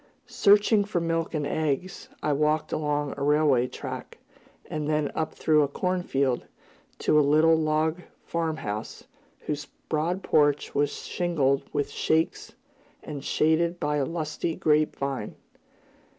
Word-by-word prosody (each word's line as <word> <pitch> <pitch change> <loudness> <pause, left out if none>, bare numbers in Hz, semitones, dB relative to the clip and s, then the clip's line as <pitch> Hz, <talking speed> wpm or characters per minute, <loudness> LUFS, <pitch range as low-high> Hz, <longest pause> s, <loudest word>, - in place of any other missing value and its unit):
Searching 205 +1 +4
for 200 -3 -1
milk 165 0 -1
and 150 -2 -1
eggs, 155 +4 -2
I 150 - +2
walked 155 +1 +1
along 145 -1 -1
a - - -6
railway 145 -4 +3
track - - -7 0.5
and 155 -1 -4
then 150 -1 0
up 160 - -3
through 155 -1 +3
a 145 - +2
cornfield, 140 -6 -1 0.5
to 150 - +3
a - - +6
little 155 +3 +4
log 160 +2 0 0.2
farm 165 -2 -2
house, 105 -3 -5 0.4
whose 145 -1 -4 0.2
broad 170 +5 -1
porch 145 -1 +2
was 145 0 +2
shingled 145 -6 +1
with 145 -1 -1
"shakes" 160 +3 0 0.5
and 145 -2 -7
shaded 165 +4 +1
by 150 0 0
a 140 - +1
lusty 160 +1 -3
grape 155 0 +2
vine. 135 -6 -4
155 Hz, 135 wpm, -26 LUFS, 145-165 Hz, 0.5 s, a